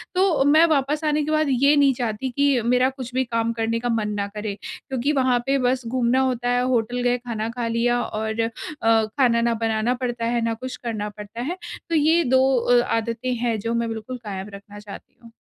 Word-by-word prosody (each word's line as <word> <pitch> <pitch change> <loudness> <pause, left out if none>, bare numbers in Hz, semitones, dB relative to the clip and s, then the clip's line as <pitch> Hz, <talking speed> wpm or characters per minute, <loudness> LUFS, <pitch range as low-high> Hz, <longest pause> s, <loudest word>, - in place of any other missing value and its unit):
तो 365 -6 +3
मैं 310 +3 +6
वापस 300 0 0
आने 300 -1 +1
के 310 - -2
बाद 310 0 +2
ये 275 +3 +4
नहीं 280 -2 +4
चाहती 240 0 -3
कि 275 0 +2
मेरा 250 +2 +3
कुछ 260 -2 -8
भी 260 +1 +1
काम 230 -2 -1
करने 230 0 -1
का 245 +1 -2
मन 220 -2 0
ना 200 - -1
करे 210 -1 -3
क्योंकि 265 +1 -3
वहाँ 255 -3 +2
पे 275 +1 +2
बस 250 0 0
घूमना 250 +1 +1
होता 250 -2 0
है, 245 0 +2
होटल 245 -1 0
गए 245 0 +2
खाना 230 -3 -4
खा 235 0 -3
लिया 240 +1 +1
और 220 0 -4
अ, 225 - 0 0.4
खाना 225 +2 +3
ना 235 0 +2
बनाना 225 +2 +1
पड़ता 240 -2 -2
है, 235 0 0
ना 230 0 0
कुछ 255 +3 -6
करना 215 -3 -3
पड़ता 210 +2 -9
है। 330 +9 -3 0.3
तो 335 - 0
ये 320 +3 +4
दो 260 -1 +3 0.2
अ, 240 0 +3 0.2
आदतें 230 +3 -2
हैं 235 -1 -1
जो 230 +3 -2
मैं 235 0 -1
बिल्कुल 225 +3 -6
कायम 195 -1 -5
रखना 200 +1 -11
चाहती 205 -1 -12
हूँ। 230 - -14
240 Hz, 220 wpm, -23 LUFS, 225-260 Hz, 0.4 s, मैं